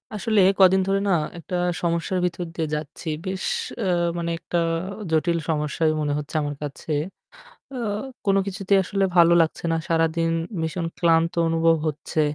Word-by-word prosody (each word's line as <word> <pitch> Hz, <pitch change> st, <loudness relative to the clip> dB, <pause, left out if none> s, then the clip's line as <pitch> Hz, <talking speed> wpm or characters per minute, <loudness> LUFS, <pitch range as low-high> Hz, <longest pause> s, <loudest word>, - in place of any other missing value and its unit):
আসলে 215 Hz, 0 st, +1 dB, 0.2 s
কদিন 190 Hz, 0 st, +6 dB
ধরে 195 Hz, 0 st, +2 dB
না -, -, +3 dB, 0.3 s
একটা 180 Hz, +2 st, -6 dB, 0.3 s
সমস্যার 170 Hz, +2 st, 0 dB
ভিতর 175 Hz, 0 st, -2 dB
দিয়ে 160 Hz, -2 st, -1 dB
যাচ্ছি। 150 Hz, +3 st, -7 dB, 0.2 s
বেশ 190 Hz, 0 st, -3 dB, 0.4 s
অ্যা 220 Hz, -, -1 dB, 0.3 s
মানে 170 Hz, 0 st, -2 dB
একটা 175 Hz, +1 st, -3 dB, 0.5 s
জটিল 170 Hz, +2 st, +2 dB
সমস্যাই 155 Hz, +1 st, +1 dB
মনে 145 Hz, -1 st, 0 dB
হচ্ছে 150 Hz, +2 st, -6 dB
আমার 145 Hz, 0 st, -3 dB
কাছে। 145 Hz, +2 st, -6 dB, 0.8 s
অ -, -, -5 dB, 0.5 s
কোনো 195 Hz, 0 st, +4 dB
কিছুতেই 195 Hz, 0 st, +1 dB
আসলে 195 Hz, +2 st, 0 dB
ভালো 170 Hz, 0 st, +7 dB
লাগছে 160 Hz, -, -3 dB
না। -, -, +2 dB
সারাদিন 165 Hz, 0 st, +1 dB, 0.3 s
ভীষণ 165 Hz, +1 st, -2 dB
ক্লান্ত 165 Hz, -1 st, +3 dB, 0.2 s
অনুভব 165 Hz, 0 st, +3 dB
হচ্ছে 155 Hz, +1 st, -3 dB
165 Hz, 150 wpm, -24 LUFS, 160-185 Hz, 0.8 s, ভালো